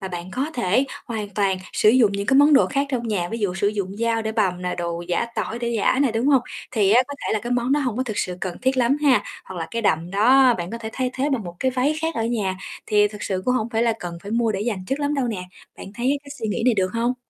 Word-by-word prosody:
mà 190 - -5
bạn 175 0 -6
có 265 +10 -2
thể 240 +2 +2 0.2
hoàn 220 -4 -4
toàn 195 -2 +1
sử - - +3
dụng 225 -3 +5
những 200 0 -3
cái 265 - +4
món 290 +2 +6
đồ 275 - +6
khác 280 0 0
trong 240 -3 -2
nhà, 180 -5 -1
ví 230 - -4
dụ 200 -4 -1
sử 195 +2 +1
dụng 200 -2 -3
dao 230 0 0
để 220 0 -2
bằm 185 -5 0
nè, 180 - -2
đồ 170 -1 -3
giã 180 +6 0
tỏi 230 - -3
để 240 0 -2
giã 225 +4 +2
nè, 265 -5 +1
đúng 225 +3 0
hông? 275 -4 +4 0.3
Thì 210 -6 +2
á, 240 +4 +6
có 285 - -5
thể - - 0
là 220 - +1
cái 240 +3 -3
món 245 +2 +1
đó 295 - +3
hổng 250 -5 -2
có 255 - +1
thực 220 -5 -4
sự 180 -1 -2
cần 180 -2 -4
thiết 260 +1 +1
lắm 250 +2 +3
ha, 275 -4 +4 0.2
hoặc 190 - -9
là 165 - -3
cái 230 0 -3
đầm 170 -4 +1
đó 250 +6 +5
bạn 175 -3 -5
có 230 - -5
thể 220 -1 -6
thay 255 0 -1
thế 270 +2 0
bằng 235 -6 -1
một 175 0 -8
cái 260 - +2
váy 260 +4 +1
khác 325 0 -1
ở 225 - -1
nhà, 210 -5 -1 0.3
thì 210 -1 +4
thực 210 0 -10
sự 185 -1 -2
cũng 250 - +2
hổng 220 -2 0
phải 225 -1 +1
là 235 -1 +3
cần 175 -3 -6
phải 200 - -8
mua 230 -1 +1
để 195 - -3
dành 210 -4 -2
trước 270 - -1
lắm 290 0 0
đâu 270 -3 0
nè, 200 -5 -3 0.3
bạn - - -9
thấy 260 +4 0
cái 280 - -12
suy 225 - -3
nghĩ 220 +3 -2
này 250 - +5
được 185 -2 +1
hông? 235 +2 0
225 Hz, 305 wpm, -23 LUFS, 195-255 Hz, 0.3 s, món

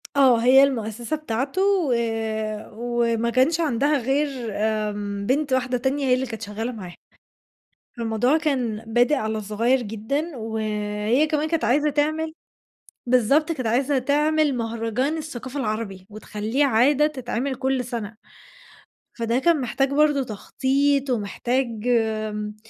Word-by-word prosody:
آه، 265 -4 +6
هي 265 +2 +7
المؤسسة 240 0 -1
بتاعته 275 +4 -2
و 385 -9 +2 0.8
وما 235 0 0
كانش 260 +7 +2
عندها 290 -1 +2
غير 275 +4 +1 0.3
آمم، 205 -1 -2
بنت 275 +3 0
واحدة 255 -1 +1
تانية 270 +3 -1
هي 255 - +3
اللي 255 +1 +1
كانت 225 -3 -7
شغّالة 225 +3 -4
معاه. 190 -7 -8 1.0
فالموضوع 235 +5 +1
كان 255 -9 -1
بادئ 245 +6 +3
على 220 -4 -2
صغيّر 230 +5 +1
جدًا 245 +8 -3
وهي 215 +3 -1
كمان 305 0 0
كانت 330 -1 0
عايزة 295 +5 +3
تعمل 310 +2 0 0.7
بالضبط، 265 +7 +3
كانت 260 -7 -4
عايزة 265 +4 +2
تعمل 295 +2 +2
مهرجان 230 +5 -1
الثقافة 275 -3 -6
العربي 215 -5 -4
وتخلّيه 215 +5 -2
عادة 275 +4 +4
تتعمل 260 -2 -3
كلّ 265 0 -1
سَنة، 230 -3 -5 1.0
فده 235 +1 0
كان 320 +2 +3
محتاج 270 +3 0
برضه 295 -1 +3
تخطيط 270 +5 0
ومحتاج 235 +1 -1
آمم، 215 -2 -1
250 Hz, 125 wpm, -23 LUFS, 220-285 Hz, 1.0 s, هي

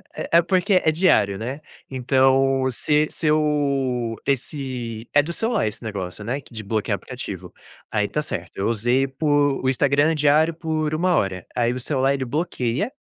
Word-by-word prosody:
É - - -4
é - - +5
porque 185 +3 +1
é 160 - +4
diário, 150 - +3
né? 130 +7 -5 0.3
Então 135 +1 +2
se 150 +5 +1
se 155 - -3
eu 140 -6 +1
esse 125 -4 -3
é 145 - +6
do 165 +4 -5
celular 225 - 0
esse 105 - -6
negócio, 100 -2 -5
né, 130 +6 -3
q 125 - -19
de 110 -1 -6
bloquear 110 +1 -1
aplicativo, - - -8 0.4
aí, 105 -1 +1
tá 150 - -2
certo, 90 - -5
eu 100 - 0
usei 120 +4 +1
por 145 0 +1
o 130 - +2
Instagram 140 +4 +2
diário 150 +2 +3
por 155 -2 -2
1 180 +1 +2
hora, 95 -3 -1
aí 120 -1 +2
o 130 - -4
celular 135 +1 +1
ele 130 -1 -3
bloqueia, 150 - -2
135 Hz, 175 wpm, -22 LUFS, 120-150 Hz, 0.4 s, é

